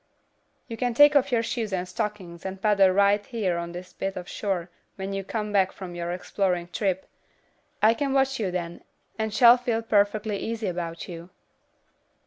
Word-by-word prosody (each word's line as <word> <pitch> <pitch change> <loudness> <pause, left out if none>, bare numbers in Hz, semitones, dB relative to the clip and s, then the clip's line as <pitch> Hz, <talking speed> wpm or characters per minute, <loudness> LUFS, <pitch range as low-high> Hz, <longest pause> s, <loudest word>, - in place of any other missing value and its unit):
"You 230 - -6
can 245 0 -1
take 290 +3 +7
off 280 -1 +3
your 230 -2 +2
shoes 225 -2 -3
and 185 -1 -2
stockings 180 -2 -5
and 190 0 -5
paddle 200 -2 +4
right 200 +2 +3
here 200 -8 -2
on 170 0 -5
this 180 +1 -9
bit 195 0 -3
of 180 -1 -6
shore 185 -4 -3 0.2
when 195 0 -5
you 195 0 -3
come 210 +1 -3
back 190 -2 +3
from 185 -2 -8
your 175 0 -4
exploring 180 -1 -1
trip. 190 0 -1 0.8
I 220 +1 +7
can 275 +3 -2
watch 270 -1 +2
you 205 -4 0
then, 175 -1 -5 0.4
and 220 0 -1
shall 235 +3 +7
feel 235 -2 -1
perfectly 210 0 +1
easy 225 -1 -3
about 170 -2 -4
you." 170 0 -9
200 Hz, 180 wpm, -26 LUFS, 180-225 Hz, 0.8 s, take